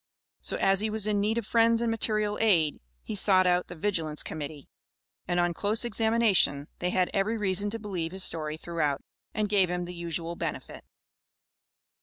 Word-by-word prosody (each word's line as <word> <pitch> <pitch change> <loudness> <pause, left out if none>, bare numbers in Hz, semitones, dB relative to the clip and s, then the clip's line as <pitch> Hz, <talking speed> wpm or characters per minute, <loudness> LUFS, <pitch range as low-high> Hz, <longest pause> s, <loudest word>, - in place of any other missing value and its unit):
So - - 0
as 195 0 +3
he 215 +1 0
was 215 -1 0
in 210 -1 +1
need 215 +3 0
of 235 - -2
friends 230 +1 +3
and 235 -1 0
material 215 -2 0
aid, 170 -9 +2 0.2
he - - -6
sought 190 -2 +4
out 180 0 +2
the 180 - -9
Vigilance 160 -4 -2
Committee, 150 -2 -7 0.6
and 175 0 0
on 175 0 +1
close 210 +6 0
examination 220 -10 +2
they 180 - -1
had 180 0 +1
every 210 +3 0
reason 205 0 +1
to 225 - -3
believe 185 -7 -4
his 190 0 -2
story 155 -3 -1
throughout, 160 -4 -2 0.3
and 215 -1 0
gave 195 -3 +3
him 180 0 -2
the 175 - -7
usual 170 0 -4
benefit. - - -6
190 Hz, 180 wpm, -28 LUFS, 170-215 Hz, 0.6 s, sought